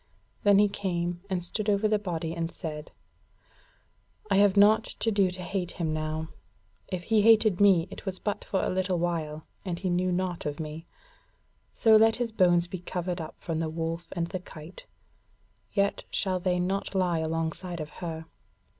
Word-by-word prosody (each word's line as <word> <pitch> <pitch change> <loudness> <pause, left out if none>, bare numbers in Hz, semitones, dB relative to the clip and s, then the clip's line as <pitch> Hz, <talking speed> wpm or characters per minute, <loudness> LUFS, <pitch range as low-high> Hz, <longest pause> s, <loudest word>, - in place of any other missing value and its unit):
And 200 -1 +6
he 205 - +6
came 175 -3 -2
and 180 -2 -1
stood 210 +4 -2
over 205 +1 +3
the 215 0 +2
body 165 -4 -3
and 165 0 -3
said: 155 -3 -6 1.4
"I 195 - +5
have 200 0 +5
naught 215 +2 +6
to 225 - -2
do 200 -3 +3
to 180 0 -7
hate 185 -2 -3
him 160 -3 -2
now: 155 0 -3 0.6
if 180 -2 -4
he 220 +1 +3
hated 215 -3 +5
me, 190 -4 +5
it - - -9
was 190 -2 -4
but 205 +1 -3
for 190 - -1
a - - 0
little 185 0 0
while, 160 -3 -2 0.2
and 180 -3 -3
he 185 0 -2
knew 180 +1 +1
naught 180 -2 -2
of 145 +1 -4
me. 160 +1 -6 0.8
So 220 -1 +5
let 225 +1 +5
his 240 -2 -2
bones 175 -4 +4
be 180 +1 -6
covered 180 0 -3
up 155 - -7
from 165 -2 -3
the 165 -1 -1
wolf 165 +1 -3
and 170 -2 -1
the 185 +2 -4
kite. 165 -1 -12 0.8
Yet 200 -1 +1
shall 185 -2 0
they 180 0 0
not 195 +2 -2
lie 180 -3 +2
alongside 165 +2 -2
of 155 0 -6
her. 160 -2 -4
180 Hz, 180 wpm, -28 LUFS, 165-195 Hz, 1.4 s, And